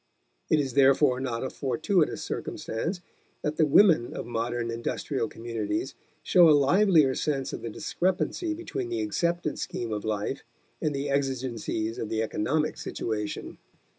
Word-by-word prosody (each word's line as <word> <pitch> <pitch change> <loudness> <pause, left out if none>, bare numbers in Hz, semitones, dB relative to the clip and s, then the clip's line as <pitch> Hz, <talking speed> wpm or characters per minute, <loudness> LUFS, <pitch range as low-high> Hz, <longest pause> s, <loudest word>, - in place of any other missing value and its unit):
It 155 - +4
is 135 -3 -1
therefore 135 -1 +4
not 125 -3 -2
a 130 - -3
fortuitous 150 - 0
circumstance 170 - -4 0.4
that 150 +1 -2
the 155 - +4
women 155 - +5
of - - -4
modern 120 0 -2
industrial 115 +2 -2
communities 115 +1 -3 0.3
show 175 -3 +6
a 150 - +7
livelier 155 -1 +4
sense 135 -1 -1
of - - -5
the 115 - -4
discrepancy 190 - -1
between 360 +2 -4
the 350 -1 -1
accepted 170 - -1
scheme 115 -2 -3
of 105 - -3
life 105 -1 -2 0.4
and 150 -2 0
the 140 +1 -2
exigencies 125 -5 -2
of 110 - -3
the 110 0 0
economic 150 +8 -1
situation. 105 -2 -4
135 Hz, 145 wpm, -27 LUFS, 115-160 Hz, 0.4 s, a